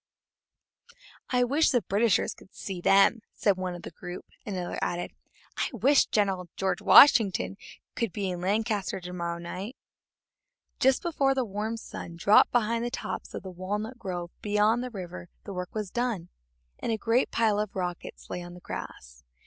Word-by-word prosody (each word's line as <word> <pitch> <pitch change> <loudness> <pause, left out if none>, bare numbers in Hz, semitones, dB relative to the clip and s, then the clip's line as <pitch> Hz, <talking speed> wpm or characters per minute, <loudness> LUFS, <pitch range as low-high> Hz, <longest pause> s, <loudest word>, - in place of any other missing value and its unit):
"I 250 -1 +3
wish 285 +6 +3
the 245 -4 +2
Britishers 205 +3 +2
could 190 - -19
see 190 -3 -5
them!" 195 +5 +5 0.2
said 200 -2 +2
one 185 -1 -3
of 175 - -10
the - - -7
group; 175 +2 -8 0.2
and 205 - -3
another 180 -1 -3
added: 175 0 -2 0.5
"I - - 0
wish 265 +5 +4
General 190 -4 0 0.3
Washington 215 -8 +6 0.4
could 230 -4 -1
be 195 -1 -2
in 175 -1 -5
Lancaster 205 0 0
to 180 0 -8
morrow 170 -1 -3
night!" 185 +8 -6 1.0
Just 265 -1 +3
before 275 -5 +1
the 260 -2 +1
warm 215 +2 -3
sun 170 -6 -8
dropped 200 +5 +5
behind 230 -1 +1
the 240 - -1
tops 260 - -5
of - - -6
the 190 - -7
walnut 210 +7 -4
grove 175 -3 -5
beyond 210 +3 +2
the 255 - -4
river 180 -5 -8
the 200 - -7
work 180 +1 -5
was 210 -4 -3
done, 235 -8 -2 0.5
and - - -2
a 220 - 0
great 230 +4 +2
pile 215 -3 +2
of 210 -1 -3
rockets 180 -2 -5
lay 180 - -4
on 175 0 -9
the - - -11
grass. 65 - -8
200 Hz, 175 wpm, -28 LUFS, 180-230 Hz, 1.0 s, Washington